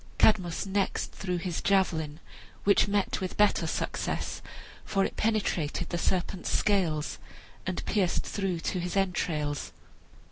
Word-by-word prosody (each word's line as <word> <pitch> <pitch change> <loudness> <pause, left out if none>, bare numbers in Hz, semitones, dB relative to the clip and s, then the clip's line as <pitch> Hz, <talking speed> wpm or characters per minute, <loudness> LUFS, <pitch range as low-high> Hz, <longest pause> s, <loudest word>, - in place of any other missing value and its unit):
Cadmus 185 -6 +3
next 195 0 0
threw 180 -2 -2
his 175 -1 -2
javelin, 160 -6 +1 0.4
which 200 +1 +5
met 200 -1 0
with 185 - -3
better 210 0 +4
success, - - -2 0.4
for 195 -1 +1
it - - -4
penetrated 185 -7 0
the 175 - -1
serpent's 185 +1 0
scales, 170 -7 +1 0.5
and 185 - -2
pierced 190 -5 +1
through 190 -4 -2
to 185 - -1
his 180 +2 -2
entrails. 155 -6 0
185 Hz, 130 wpm, -29 LUFS, 170-200 Hz, 0.5 s, which